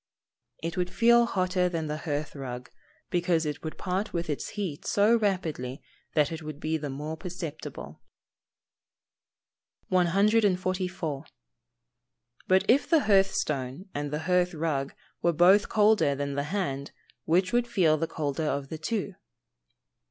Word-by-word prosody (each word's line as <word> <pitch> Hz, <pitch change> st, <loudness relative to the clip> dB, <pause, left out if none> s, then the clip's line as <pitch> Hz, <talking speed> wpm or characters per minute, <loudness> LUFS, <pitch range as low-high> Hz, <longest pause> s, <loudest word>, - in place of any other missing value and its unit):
_ -, -, 0 dB
It 170 Hz, -, -6 dB
would 180 Hz, 0 st, 0 dB
feel 235 Hz, +4 st, +5 dB
hotter 185 Hz, -3 st, +1 dB
than 165 Hz, -2 st, -2 dB
the 150 Hz, 0 st, -3 dB
hearth 145 Hz, +1 st, -2 dB
rug, 125 Hz, -2 st, -7 dB, 0.4 s
because 175 Hz, -2 st, +1 dB
it 150 Hz, -1 st, -3 dB
would 160 Hz, -, -5 dB
part 190 Hz, +3 st, -2 dB
with 170 Hz, -2 st, -2 dB
its 145 Hz, -, -4 dB
heat 180 Hz, -8 st, -3 dB
so 210 Hz, +3 st, +4 dB
rapidly 165 Hz, -, -1 dB, 0.4 s
that 150 Hz, -1 st, +3 dB
it 165 Hz, 0 st, -5 dB
would 155 Hz, -2 st, -7 dB
be 155 Hz, +1 st, -1 dB
the 150 Hz, -2 st, -3 dB
more 150 Hz, +4 st, -4 dB
perceptible. 170 Hz, -3 st, -7 dB, 1.9 s
144. 185 Hz, -4 st, +1 dB, 1.2 s
_But 190 Hz, +1 st, +4 dB
if 270 Hz, +4 st, +3 dB
the 325 Hz, -3 st, +5 dB
hearth 195 Hz, -2 st, +4 dB
stone 150 Hz, -1 st, -3 dB
and 145 Hz, 0 st, -3 dB
the 150 Hz, +2 st, -3 dB
hearth 180 Hz, +1 st, +1 dB
rug 150 Hz, -4 st, -2 dB, 0.3 s
were 170 Hz, -, +2 dB
both 185 Hz, +6 st, +5 dB
colder 210 Hz, -9 st, +4 dB
than 140 Hz, 0 st, -3 dB
the 140 Hz, +1 st, -1 dB
hand, 140 Hz, -8 st, -2 dB, 0.4 s
which 180 Hz, +5 st, +2 dB
would 240 Hz, 0 st, +2 dB
feel 185 Hz, -10 st, +3 dB
the 165 Hz, +1 st, -1 dB
colder 155 Hz, 0 st, -2 dB
of 140 Hz, -1 st, -2 dB
the 160 Hz, -, -6 dB
two? 205 Hz, +2 st, -2 dB
170 Hz, 145 wpm, -28 LUFS, 150-195 Hz, 1.9 s, feel